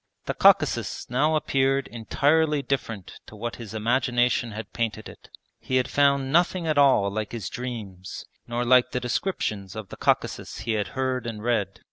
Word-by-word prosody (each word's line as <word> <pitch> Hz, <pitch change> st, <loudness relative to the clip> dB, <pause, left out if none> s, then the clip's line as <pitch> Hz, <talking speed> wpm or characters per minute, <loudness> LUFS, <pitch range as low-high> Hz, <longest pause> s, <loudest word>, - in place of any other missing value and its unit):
The -, -, -1 dB
Caucasus -, -, +3 dB
now 150 Hz, +5 st, +2 dB
appeared 135 Hz, -2 st, +1 dB
entirely 145 Hz, +6 st, +1 dB
different 115 Hz, -7 st, -4 dB
to -, -, -12 dB
what 115 Hz, +2 st, -5 dB
his 110 Hz, -2 st, -8 dB
imagination 120 Hz, +1 st, +1 dB
had 110 Hz, 0 st, -8 dB
painted 110 Hz, -2 st, -2 dB
it. -, -, -14 dB, 0.3 s
He 130 Hz, -, -3 dB
had 130 Hz, 0 st, +2 dB
found 140 Hz, -1 st, +2 dB
nothing 175 Hz, +2 st, +2 dB
at 155 Hz, -2 st, +2 dB
all 130 Hz, -8 st, +4 dB
like 110 Hz, +2 st, -4 dB
his 110 Hz, -6 st, -4 dB
dreams, 105 Hz, -7 st, -6 dB, 0.2 s
nor 120 Hz, +1 st, -2 dB
like 125 Hz, +1 st, +4 dB
the 125 Hz, -, 0 dB
descriptions 115 Hz, -, -2 dB
of 110 Hz, -3 st, -7 dB
the -, -, -9 dB
Caucasus -, -, -1 dB
he 115 Hz, +1 st, -2 dB
had 105 Hz, -2 st, 0 dB
heard 130 Hz, -2 st, -1 dB
and 110 Hz, -2 st, -6 dB
read. 110 Hz, -5 st, 0 dB
120 Hz, 170 wpm, -25 LUFS, 110-135 Hz, 0.3 s, all